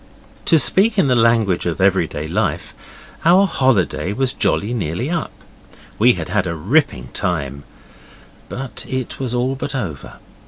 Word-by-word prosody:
To 165 - +5
speak 205 +8 +3
in 190 - +4
the 130 -2 +2
language 115 -6 +2
of 85 +2 -3
everyday 90 -5 +1
life, 105 +6 -2 0.5
our 180 +4 +5
holiday 100 - +1
was 130 +2 -1
jolly 105 +4 0
nearly 115 - -3
up. 170 -2 -2 0.7
We 120 +3 +5
had - - -6
had 105 -3 0
a 85 - -3
ripping 95 - 0
time, 70 -5 -3 0.8
but 130 -3 -5
it 130 -2 -4
was 125 -2 -2
all 125 +2 0
but 135 +1 -4
over. 90 - -5
115 Hz, 150 wpm, -19 LUFS, 90-135 Hz, 0.8 s, To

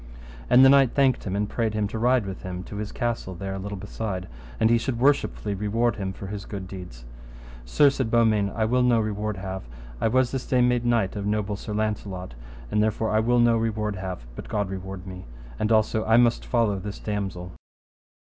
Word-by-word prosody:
And 130 +2 +7
the - - +8
knight 135 -2 +5
thanked 135 -3 +2
him, 95 -1 -2
and 105 +1 0
prayed 110 -1 -1
him 105 -1 0
to 110 - -4
ride 125 -1 +3
with 95 -1 -6
him 90 -1 -5
to 100 - -8
his 105 0 -4
castle 115 -6 -3
there 95 +2 -5
a 95 - -4
little 100 +1 -5
beside, 100 -1 -5 0.3
and 110 - +4
he 115 - +4
should 120 0 -2
worshipfully 135 -6 +1
reward 105 +4 0
him 95 -2 -3
for 95 - -9
his 100 +1 -6
good 95 -3 -6
deeds. 90 -12 -9 0.6
Sir, 140 - +4
said 130 -4 -2
Beaumains, 110 -4 +3
I 110 - +1
will 125 +3 +2
no 125 -2 +4
reward 105 -1 -2
have: 95 0 -5 0.4
I - - +3
was 130 +2 +2
this 135 -2 -4
day 130 - +2
made 125 -1 +2
knight 115 -5 +1
of 100 -1 -3
noble 105 -1 -1
Sir 105 +1 -6
Launcelot, 100 - -3 0.4
and 105 - +2
therefore 110 +1 0
I 110 - +3
will 120 +2 +2
no 120 -1 +5
reward 105 -2 -1
have, 95 -7 -6
but - - -9
God 105 -2 -1
reward 95 0 -6
me. 90 -1 -8 0.3
And 105 - 0
also 110 0 +2
I 110 +1 +4
must 120 -1 +3
follow 115 -5 +1
this 100 +1 -6
damosel. 95 -4 -4
105 Hz, 210 wpm, -25 LUFS, 95-115 Hz, 0.6 s, the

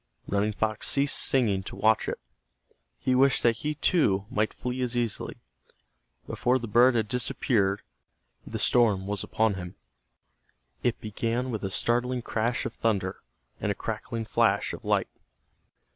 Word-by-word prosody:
Running 100 +2 +1
Fox 110 +1 -1
ceased 140 +1 +1
singing 110 -8 +1
to - - -8
watch 110 0 +2
it. - - -4 0.8
He 130 - 0
wished 135 +1 +4
that 115 -1 +3
he, 150 +7 -2
too, 140 - +2
might 110 +1 +1
flee 125 +1 -4
as 125 -1 -1
easily. 120 -3 -2 0.9
Before 125 +1 +1
the 120 -2 -5
bird 120 +4 +5
had 110 -2 +1
disappeared, 110 -4 0 0.6
the - - -5
storm 105 -6 +3
was 100 -1 -2
upon 110 -1 +1
him. 90 -1 -7 1.1
It 120 - 0
began 115 +4 -2
with 110 -3 -4
a 95 - -1
startling 120 +4 0
crash 115 +2 -1
of - - -3
thunder, 100 -5 -1 0.4
and - - 0
a - - -2
crackling 115 -1 -4
flash - - +2
of - - -8
light. - - +1
115 Hz, 150 wpm, -27 LUFS, 105-125 Hz, 1.1 s, bird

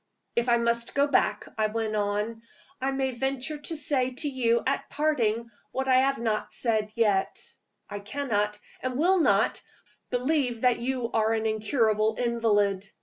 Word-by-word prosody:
"If 235 +1 +1
I 235 - +5
must 235 0 0
go 280 0 +4
back," 285 - +1
I 215 - +3
went 215 0 -2
on, 210 +2 -1 0.4
"I 265 - +1
may 270 -1 -1
venture 270 +4 -3
to 315 +3 -4
say 275 -4 +1
to 260 +4 -4
you 235 -4 +1
at 270 - -1
parting 235 -7 0 0.2
what 265 0 -2
I 260 -1 +5
have 275 +1 +3
not 220 -2 -1
said 215 -3 -1
yet. 205 -4 +1 0.5
I 205 - -6
cannot, 210 -2 -1 0.2
and 255 -1 -2
will 365 +5 +3
not, - - +2 0.5
believe 250 -2 0
that 250 -2 +3
you 245 -1 -2
are 220 0 +2
an 220 0 -2
incurable 220 0 +1
invalid. 205 -5 +1
235 Hz, 160 wpm, -27 LUFS, 215-265 Hz, 0.5 s, I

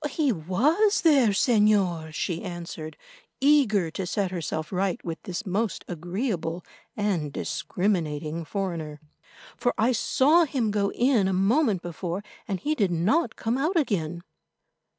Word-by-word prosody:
"He 295 -4 +1
was 260 - +2
there, 290 -8 +5
Señor," 200 -7 +2
she 165 +2 -2
answered, 170 -3 -7 0.4
eager 250 - +3
to 185 +2 -4
set 195 0 -1
herself 160 -3 -4
right 190 0 0
with 165 -1 -5
this 185 +4 -4
most 205 +3 -2
agreeable 175 - -3 0.3
and 185 -8 -1
discriminating 165 -3 -2
foreigner, 165 -4 -4 0.6
"for 245 - 0
I 230 +4 +3
saw 295 +7 +4
him 250 -7 -1
go 200 -1 0
in 240 -6 +2
a 190 - 0
moment 200 - +2
before, 175 +2 -4 0.2
and 195 -3 -2
he 300 - 0
did 205 -10 +1
not 210 - +1
come 230 +4 -1
out 330 +6 +1
again." 175 - -1
195 Hz, 135 wpm, -26 LUFS, 170-240 Hz, 0.6 s, there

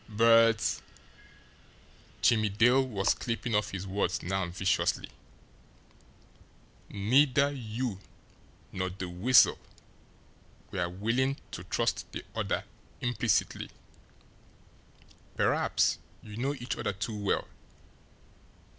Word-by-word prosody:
"But" 115 0 +4 1.4
Jimmie 110 -3 +4
Dale 120 +6 +4
was 100 -6 +1
clipping 115 0 -3
off 105 0 +1
his 95 -1 -5
words 100 +1 -1
now 95 0 -1
viciously 95 +2 0 1.8
"neither 135 +7 +3
you 115 -5 -4 0.7
nor 95 -1 -2
the 95 0 -6
Weasel 95 +9 +4 1.1
were 90 -3 -1
willing 115 +9 0
to - - -7
trust - - -1
the - - -6
other - - -1 0.4
implicitly 120 -3 0 1.7
perhaps - - +2 0.2
you 105 - -10
know 135 +5 -1
each 125 -2 -4
other - - -2
too 100 +3 -4
well. 100 - 0
110 Hz, 95 wpm, -29 LUFS, 95-125 Hz, 1.8 s, But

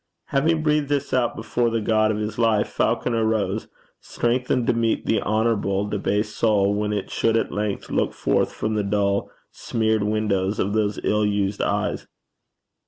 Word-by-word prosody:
Having 155 +3 +1
breathed 150 -2 +1
this 145 -1 -1
out 125 -2 +1
before 120 +1 0
the 115 0 0
God 110 0 +2
of 110 - 0
his 105 +2 -4
life, 110 -3 +2
Falconer 115 -2 0
rose, 110 -2 -1 0.3
strengthened 125 +1 -1
to - - +2
meet 115 -1 0
the 110 - +1
honourable 105 -2 0
debased 105 +1 -1
soul 105 -3 +2
when 105 0 -1
it 100 -2 -3
should 115 0 +1
at - - -1
length 105 -1 -3
look - - +1
forth - - 0
from 110 - -3
the 105 - +1
dull 100 0 0 0.2
smeared 110 -1 0
windows 105 -1 0
of 100 +2 -1
those 105 -1 0
ill 105 0 +1
used 100 -1 0
eyes. - - -1
110 Hz, 170 wpm, -23 LUFS, 105-115 Hz, 0.3 s, God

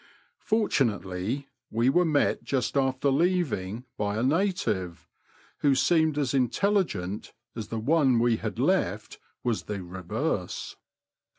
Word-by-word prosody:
Fortunately, 130 - 0 0.2
we 115 +3 +1
were 175 +7 +4
met 150 -3 +1
just 130 -1 -1
after 135 0 +2
leaving 135 - 0
by 105 0 -1
a 115 - 0
native, 120 - 0 0.5
who 140 -2 +3
seemed 160 -1 +3
as 140 -4 0
intelligent 125 - 0 0.2
as 110 -3 -5
the 115 - -4
one 135 +1 +3
we 115 -1 +3
had - - -5
left - - 0 0.2
was 120 -3 -1
the 100 -3 -4
reverse. 90 0 -3
130 Hz, 120 wpm, -27 LUFS, 105-155 Hz, 0.5 s, were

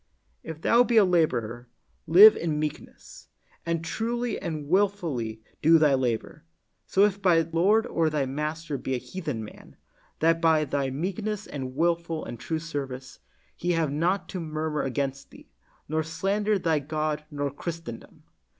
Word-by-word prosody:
If 160 -1 -8
thou 235 +6 +5
be 240 -2 +1
a 210 - +7
laborer, 125 -9 0 0.4
live 195 +7 +9
in 160 -3 -2
meekness, 155 0 -7 0.4
and 165 -1 -1
truly 235 +5 -2
and 155 -3 -5
wilfully 160 - 0 0.2
do 165 +2 +6
thy 150 -3 +4
labor; 130 +4 -2 0.4
so 195 +1 +4
if 200 -1 -1
thy 175 -4 +4
lord 185 +8 +2
or 165 -8 +1
thy 150 -3 0
master 150 +2 -3
be 130 +1 -2
a - - 0
heathen 150 -5 -5
man, - - -14 0.4
that 165 +1 +2
by 160 -2 +4
thy 140 -1 -1
meekness 195 +8 -3
and 130 -2 -6
wilful 170 0 0
and 120 - -7
true 160 - -2
service, 135 -5 -6 0.4
he 175 +1 -1
have 165 -4 0
not 175 +7 0
to 185 - -4
murmur 155 -2 -2
against 135 +1 -3
thee, - - -17 0.4
nor 155 +1 0
slander 200 +6 0
thy 165 -4 +1
God 155 +1 -2
nor 145 -1 -3
Christendom. 160 -5 -8
160 Hz, 155 wpm, -26 LUFS, 140-175 Hz, 0.4 s, live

